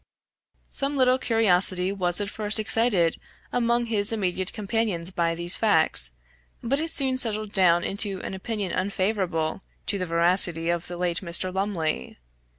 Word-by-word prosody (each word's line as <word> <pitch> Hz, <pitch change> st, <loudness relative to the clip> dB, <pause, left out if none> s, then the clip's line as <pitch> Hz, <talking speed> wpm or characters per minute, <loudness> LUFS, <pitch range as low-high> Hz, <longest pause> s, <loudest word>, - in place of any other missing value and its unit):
Some 280 Hz, +1 st, -2 dB
little 255 Hz, 0 st, +4 dB
curiosity 190 Hz, -6 st, +2 dB
was 180 Hz, -2 st, 0 dB
at 205 Hz, -, -2 dB
first 215 Hz, 0 st, -2 dB
excited 215 Hz, -6 st, +1 dB, 0.4 s
among 240 Hz, 0 st, +1 dB
his 215 Hz, -2 st, +1 dB
immediate 190 Hz, -4 st, -1 dB
companions 205 Hz, -5 st, -1 dB
by 170 Hz, -2 st, 0 dB
these 170 Hz, +1 st, -2 dB
facts, -, -, +3 dB, 0.5 s
but 275 Hz, +5 st, 0 dB
it 325 Hz, +1 st, -2 dB
soon 265 Hz, -5 st, 0 dB
settled 215 Hz, -3 st, 0 dB
down 175 Hz, -3 st, +3 dB
into 195 Hz, -1 st, 0 dB
an -, -, -5 dB
opinion 200 Hz, -1 st, -3 dB
unfavorable 185 Hz, -4 st, -1 dB, 0.2 s
to 200 Hz, -, -2 dB
the 185 Hz, -, -2 dB
veracity 170 Hz, 0 st, +2 dB
of 175 Hz, 0 st, -3 dB
the 175 Hz, -, -6 dB
late 175 Hz, -1 st, 0 dB
Mr. 185 Hz, +1 st, -1 dB
Lumley. 185 Hz, -, -2 dB
195 Hz, 150 wpm, -25 LUFS, 175-225 Hz, 0.5 s, little